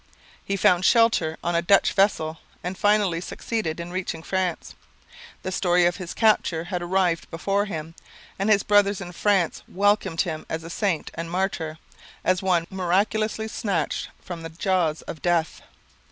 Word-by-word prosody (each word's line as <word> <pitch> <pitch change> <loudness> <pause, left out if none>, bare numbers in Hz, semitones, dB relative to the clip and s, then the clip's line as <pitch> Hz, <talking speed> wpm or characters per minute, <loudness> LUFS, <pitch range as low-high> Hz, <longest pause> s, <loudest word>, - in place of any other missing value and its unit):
He 195 - -2
found 180 -1 +4
shelter 225 -9 +3
on 175 - 0
a 170 - +2
Dutch 195 +3 +4
vessel 165 -5 +1 0.2
and 180 +2 -3
finally 205 -4 +2
succeeded 185 -4 -3
in 170 +1 -6
reaching 180 -3 -4
France. 185 -2 -2 0.7
The 185 - -3
story 180 -1 +3
of 175 0 +1
his 185 -3 -7
capture 205 -7 +2
had 180 0 -4
arrived 175 -1 0
before 195 +4 0
him, 160 -5 -6 0.5
and 195 +2 +1
his 205 -2 +4
brothers 205 -1 +3
in 175 -3 -7
France 190 -1 +1
welcomed 205 -4 +1
him 160 -4 -3
as 160 0 -3
a 165 - -8
saint 190 -4 -1
and 165 0 -5
martyr, 170 -3 -2 0.5
as 185 -1 +2
one 180 -3 +2
miraculously 210 +4 0
snatched 200 -6 -2
from 175 -2 -7
the 165 - -6
jaws 165 -2 0
of 155 - -8
death. 170 -2 0
180 Hz, 160 wpm, -24 LUFS, 165-200 Hz, 0.7 s, found